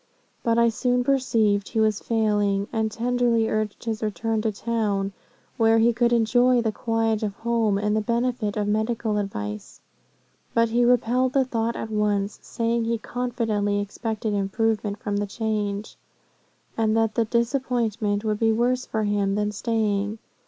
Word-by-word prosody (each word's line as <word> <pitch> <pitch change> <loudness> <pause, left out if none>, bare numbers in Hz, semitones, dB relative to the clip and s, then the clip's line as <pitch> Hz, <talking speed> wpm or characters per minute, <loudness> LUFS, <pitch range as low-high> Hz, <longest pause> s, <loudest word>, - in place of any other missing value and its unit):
But 230 -1 +1
I 235 0 +5
soon 245 +2 0
perceived 225 -6 +1
he 225 - -1
was 215 -2 +2
failing, 205 -3 +1
and 220 -1 0
tenderly 235 0 +1
urged 215 -2 -2
his 225 -2 -3
return 220 +1 -1
to 220 0 0
town, 205 -2 -1 0.4
where 225 -1 +4
he 230 +1 +4
could 240 +1 +2
enjoy 245 +2 +4
the 225 -2 0
quiet 225 0 0
of 205 -2 -2
home, 225 -3 +1
and 210 +1 0
the 215 - +1
benefit 235 -1 -1
of 205 -1 0
medical 220 0 0
advice. 105 - -5 0.8
But 230 0 +3
he 240 +2 +2
repelled 250 +1 +2
the 270 -1 +3
thought 230 -2 -1
at 220 - -5
once, 210 -1 0
saying 230 0 -1
he 230 0 0
confidently 225 -4 -1
expected 215 +1 -3
improvement 205 +1 0
from 205 -2 -3
the 205 0 -1
change, 210 -1 -3 0.8
and 220 -1 +1
that 225 -1 +2
the 230 +1 +1
disappointment 235 -3 0
would 215 -1 -1
be 225 -1 +3
worse 245 +3 +1
for 220 -1 -1
him 205 -1 0
than 210 0 0
staying. 210 -1 -1
220 Hz, 160 wpm, -24 LUFS, 210-235 Hz, 0.8 s, I